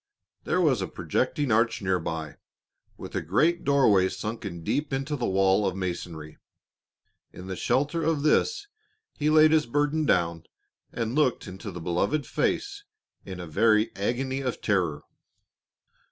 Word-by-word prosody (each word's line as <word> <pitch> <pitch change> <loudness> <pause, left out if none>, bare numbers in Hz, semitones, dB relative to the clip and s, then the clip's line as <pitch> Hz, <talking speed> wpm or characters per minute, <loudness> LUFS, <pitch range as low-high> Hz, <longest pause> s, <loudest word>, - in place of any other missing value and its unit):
There - - +1
was 140 - +2
a 95 - -2
projecting 130 - -1
arch 115 +1 +2
near 95 -2 0
by, 80 -2 -5 0.6
with - - -9
a - - 0
great 155 - +1
doorway 110 -10 +4
sunken 100 -3 -6
deep 145 - -1
into 135 +2 -2
the 125 -4 -2
wall 95 +1 +3
of 95 - -2
masonry, 85 -4 -5 0.9
in 90 - -10
the 95 0 -5
shelter 145 - 0
of 160 -3 0
this 410 - +2 0.5
he 150 0 0
laid 155 0 +6
his 155 -5 +3
burden 145 +4 0
down, 85 -2 +1 0.5
and 115 -1 -3
looked 145 -4 +1
into 95 +3 -8
the 90 -2 -7
beloved 95 - 0
face 405 0 -2 0.4
in 95 -2 -7
a 90 - -6
very 110 +6 +2
agony 130 +6 -2
of 125 -3 -3
terror. 90 -8 0
110 Hz, 150 wpm, -26 LUFS, 90-145 Hz, 0.9 s, laid